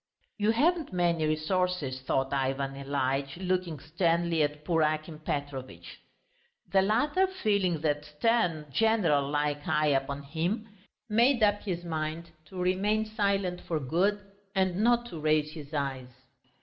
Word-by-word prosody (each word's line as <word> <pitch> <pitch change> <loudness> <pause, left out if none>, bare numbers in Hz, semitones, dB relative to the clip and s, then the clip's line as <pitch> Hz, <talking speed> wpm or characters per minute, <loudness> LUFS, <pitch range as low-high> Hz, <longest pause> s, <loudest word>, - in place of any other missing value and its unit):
"You 210 +1 +2
haven't 315 +7 +2
many 170 -3 +1
resources," 155 -3 -1
thought 135 +1 0
Ivan 135 0 -1
Ilyitch, 140 +1 -2
looking 180 -4 -1
sternly 165 +2 +1
at 150 0 -1
poor 165 -1 +2
Akim 155 0 -1
Petrovitch. 140 -4 -5 0.7
The 195 - +5
latter, 295 - +2
feeling 200 - 0
that 150 -1 0
stern 165 0 +1
general 165 - +2
like 145 0 -1
eye 150 0 +2
upon 140 0 0
him, 170 +10 -2 0.4
made 235 +3 +3
up 205 -1 +3
his 175 -4 -3
mind 160 0 -4
to 185 +2 -9
remain 200 +4 +1
silent 200 -4 -1
for 160 -2 -2
good 180 +10 +1 0.4
and 190 -2 +1
not 240 +3 +3
to 165 - -6
raise 155 0 +2
his 150 -2 -10
eyes. 135 -4 -3
165 Hz, 135 wpm, -29 LUFS, 145-200 Hz, 0.7 s, The